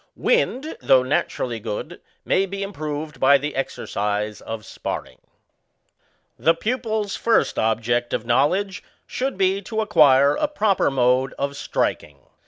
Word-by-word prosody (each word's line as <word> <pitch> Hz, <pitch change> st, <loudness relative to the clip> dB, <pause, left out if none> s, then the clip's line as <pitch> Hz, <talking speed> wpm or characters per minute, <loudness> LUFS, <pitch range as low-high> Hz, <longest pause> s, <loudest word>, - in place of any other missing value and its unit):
Wind, 320 Hz, -, 0 dB
though 130 Hz, -1 st, +5 dB
naturally 130 Hz, -3 st, -1 dB
good, 115 Hz, +10 st, -6 dB, 0.2 s
may 195 Hz, -, +2 dB
be 200 Hz, +1 st, -4 dB
improved 155 Hz, -5 st, -5 dB
by 140 Hz, -, +6 dB
the 150 Hz, +2 st, -5 dB
exercise 105 Hz, -5 st, -3 dB
of 110 Hz, -2 st, -7 dB
sparring. -, -, -6 dB, 1.2 s
The 165 Hz, +1 st, +3 dB
pupil's 220 Hz, 0 st, -2 dB
first 230 Hz, -1 st, +1 dB
object 115 Hz, +2 st, 0 dB
of 110 Hz, -, -2 dB
knowledge 180 Hz, -, +1 dB, 0.2 s
should 265 Hz, -4 st, -3 dB
be 195 Hz, +1 st, +2 dB
to 220 Hz, +3 st, -4 dB
acquire 145 Hz, -8 st, +5 dB
a 300 Hz, -, 0 dB
proper 215 Hz, -9 st, +1 dB
mode 130 Hz, 0 st, +1 dB
of 140 Hz, 0 st, -2 dB
striking. 75 Hz, -, -2 dB
150 Hz, 130 wpm, -22 LUFS, 125-200 Hz, 1.2 s, by